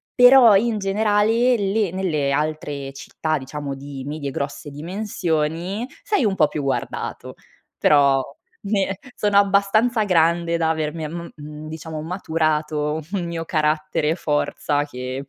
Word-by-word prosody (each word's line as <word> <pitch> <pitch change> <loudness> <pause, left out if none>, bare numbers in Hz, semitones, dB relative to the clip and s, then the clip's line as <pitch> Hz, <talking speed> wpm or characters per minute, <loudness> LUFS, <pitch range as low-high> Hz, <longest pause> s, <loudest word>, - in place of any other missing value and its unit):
Però 245 -4 +8
in 220 +1 +2
generale, 215 +4 +2
le 200 -2 0
nelle 155 -7 -1
altre 145 -2 -2
città, 155 +3 -3
diciamo 140 +1 -5
di 135 -1 -8
medie, 145 -2 -4
grosse 140 +2 -5
dimensioni, 175 - -2 0.2
sei 410 - +1
un 195 -2 +1
po' 155 -4 +4
più 150 - -3
guardato, 135 - -3 0.4
però 140 -2 +4 0.4
ne 195 -1 0 0.2
sono 205 -1 +2
abbastanza 205 +4 +3
grande 170 -1 +2
da 160 -1 +1
avermi 155 0 -3
a - - -5
mhmm, 155 -2 -8
diciamo 160 -1 -6
maturato 155 -3 -1
un 185 -3 -1
mio 165 -1 -4
carattere 155 -1 0
e 165 - +1
forza 145 -2 0
che 130 0 -6
160 Hz, 135 wpm, -22 LUFS, 150-200 Hz, 0.4 s, Però